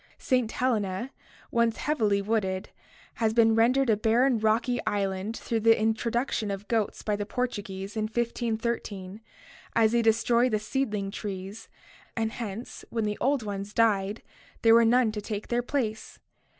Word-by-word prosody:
St. 250 Hz, -4 st, 0 dB
Helena, 225 Hz, -1 st, -1 dB, 0.4 s
once 235 Hz, -1 st, +2 dB
heavily 215 Hz, -9 st, +1 dB
wooded, 195 Hz, -3 st, -1 dB, 0.5 s
has 220 Hz, 0 st, +2 dB
been 225 Hz, -1 st, +5 dB
rendered 250 Hz, +4 st, +3 dB
a 220 Hz, -, +4 dB
barren 230 Hz, +3 st, +2 dB
rocky 225 Hz, +3 st, +1 dB
island 200 Hz, +2 st, -1 dB
through 230 Hz, -, -2 dB
the 225 Hz, +1 st, +4 dB
introduction 225 Hz, 0 st, 0 dB
of 200 Hz, +1 st, -5 dB
goats 225 Hz, -3 st, -1 dB
by 210 Hz, -, 0 dB
the 205 Hz, -, -3 dB
Portuguese 205 Hz, -5 st, -4 dB
in 215 Hz, -1 st, 0 dB
1513, 225 Hz, -3 st, -3 dB, 0.5 s
as 220 Hz, -1 st, +4 dB
they 235 Hz, 0 st, +3 dB
destroy 230 Hz, +2 st, +3 dB
the 215 Hz, -, +1 dB
seedling 215 Hz, -3 st, -2 dB
trees 200 Hz, +1 st, -6 dB, 0.5 s
and 225 Hz, -1 st, 0 dB
hence 230 Hz, 0 st, -6 dB
when 225 Hz, -1 st, -1 dB
the 210 Hz, 0 st, -2 dB
old 270 Hz, -1 st, +2 dB
ones 200 Hz, 0 st, -5 dB
died 210 Hz, -2 st, +2 dB, 0.4 s
there 225 Hz, -1 st, +7 dB
were 230 Hz, 0 st, +6 dB
none 240 Hz, -1 st, +4 dB
to 210 Hz, -1 st, -5 dB
take 210 Hz, 0 st, -5 dB
their 240 Hz, 0 st, +1 dB
place. 240 Hz, -4 st, -3 dB
225 Hz, 150 wpm, -27 LUFS, 205-235 Hz, 0.5 s, there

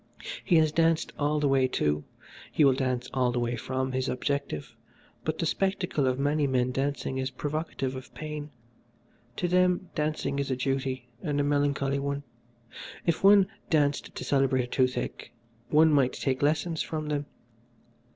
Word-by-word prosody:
He 180 Hz, -, +3 dB
has 155 Hz, -2 st, +5 dB
danced 165 Hz, 0 st, +2 dB
all 150 Hz, +1 st, +1 dB
the 145 Hz, -, +2 dB
way 135 Hz, -1 st, +3 dB
to, 75 Hz, -11 st, 0 dB, 0.5 s
he 150 Hz, -, +4 dB
will 135 Hz, -, +6 dB
dance 130 Hz, -2 st, -1 dB
all 125 Hz, -2 st, +2 dB
the 120 Hz, -, -1 dB
way 120 Hz, 0 st, -1 dB
from 130 Hz, +3 st, -2 dB
his 130 Hz, 0 st, -1 dB
objective, 140 Hz, -, -3 dB, 0.5 s
but 155 Hz, 0 st, -2 dB
the 165 Hz, -, -1 dB
spectacle 180 Hz, -5 st, 0 dB
of 130 Hz, 0 st, +1 dB
many 145 Hz, +1 st, +1 dB
men 125 Hz, -1 st, +1 dB
dancing 135 Hz, 0 st, -2 dB
is 130 Hz, 0 st, -1 dB
provocative 145 Hz, -2 st, -3 dB
of 130 Hz, -, -9 dB
pain. 150 Hz, -1 st, -5 dB, 0.9 s
To 175 Hz, -, -1 dB
them 180 Hz, 0 st, +2 dB
dancing 150 Hz, -2 st, -1 dB
is 140 Hz, -, -1 dB
a 130 Hz, -, +1 dB
duty, 130 Hz, -1 st, -2 dB
and 145 Hz, -1 st, -1 dB
a -, -, +3 dB
melancholy 140 Hz, -1 st, +1 dB
one. 140 Hz, +1 st, -2 dB, 0.8 s
If 170 Hz, +1 st, 0 dB
one 200 Hz, 0 st, +8 dB, 0.2 s
danced 145 Hz, -3 st, +1 dB
to -, -, -5 dB
celebrate 135 Hz, -2 st, +2 dB
a -, -, -3 dB
toothache 125 Hz, -2 st, -1 dB, 0.4 s
one 155 Hz, +1 st, +5 dB
might 135 Hz, -3 st, +3 dB
take 130 Hz, -2 st, -1 dB
lessons 160 Hz, +3 st, +1 dB
from 155 Hz, -1 st, -3 dB
them. 145 Hz, -1 st, -2 dB
140 Hz, 165 wpm, -28 LUFS, 130-155 Hz, 0.9 s, one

